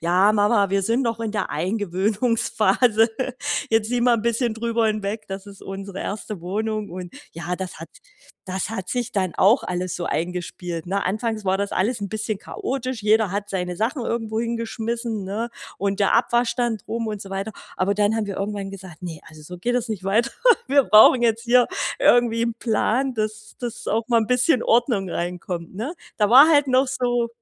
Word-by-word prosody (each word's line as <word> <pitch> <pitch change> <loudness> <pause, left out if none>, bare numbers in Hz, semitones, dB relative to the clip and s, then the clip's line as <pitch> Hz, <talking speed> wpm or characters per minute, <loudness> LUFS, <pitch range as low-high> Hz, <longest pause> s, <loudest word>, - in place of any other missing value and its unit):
„Ja, 180 +5 +4
Mama, 205 -1 +3
wir 195 0 +1
sind 230 +6 +1
noch 230 -2 -1
in 225 -2 -3
der 210 -3 -2
Eingewöhnungsphase. 210 - +1 0.6
Jetzt 225 -1 +2
sieh 245 0 0
mal 240 0 +4
'n - - -5
bisschen 235 0 +1
drüber 230 0 0
hinweg, 215 0 -2
das 195 +1 -6
ist 200 -1 -12
unsere 195 0 -7
erste 210 -1 -5
Wohnung!”, 215 +4 -3
und 180 -1 -8 0.2
ja, 170 +2 -4
das 185 -4 -6
hat 165 - -8 0.6
das 185 +1 -2
hat 190 -5 -5
sich 245 -1 -2
dann 185 -6 -1
auch 220 +7 +4
alles 180 0 -3
so 175 - -4
eingespielt, 175 0 -4
ne? 195 +2 -1
Anfangs 215 +2 -2
war 190 0 +2
das 200 0 -2
alles 225 +4 0
'n 200 - -3
bisschen 215 0 -3
chaotisch. 255 +1 -4
Jeder 215 -2 +3
hat 205 +1 -3
seine 180 -2 -2
Sachen 235 - -1
irgendwo 225 -2 -2
hingeschmissen, 230 -1 -3
ne? 210 +5 -3 0.3
Und 200 0 -1
der 200 - +3
Abwaschstand 240 -2 +1
rum 230 0 -3
und 210 -2 -4
so 195 - -8
weiter. 195 +2 -3 0.3
Aber 190 +2 +1
dann 205 +1 +2
haben 220 -2 -1
wir 200 - -5
irgendwann 200 -1 -3
gesagt: 190 -3 -11
„Ne, 165 -4 -6
also 155 -1 -14
so 180 +4 -9
geht 245 +7 -1
es 245 -1 0
nicht 205 -4 -4
weiter. 215 +5 +2 0.4
Wir 280 -1 +5
brauchen 220 +4 +7
jetzt 230 -1 +2
hier 245 +1 +4 0.3
irgendwie 235 -1 +4
'n 235 -1 -2
Plan, 245 +3 0
dass 215 -1 -4
dass 240 -1 -5
auch 225 +2 0
mal 235 -1 +3
'n 220 - -1
bisschen 250 +1 +3
Ordnung 230 -5 +2
reinkommt, 175 0 -4
ne? 230 - -4 0.2
Da 210 -1 +2
war 270 +6 +9
halt 290 -3 +4
noch 260 +1 +4
so 245 -2 0
215 Hz, 195 wpm, -23 LUFS, 195-235 Hz, 0.6 s, war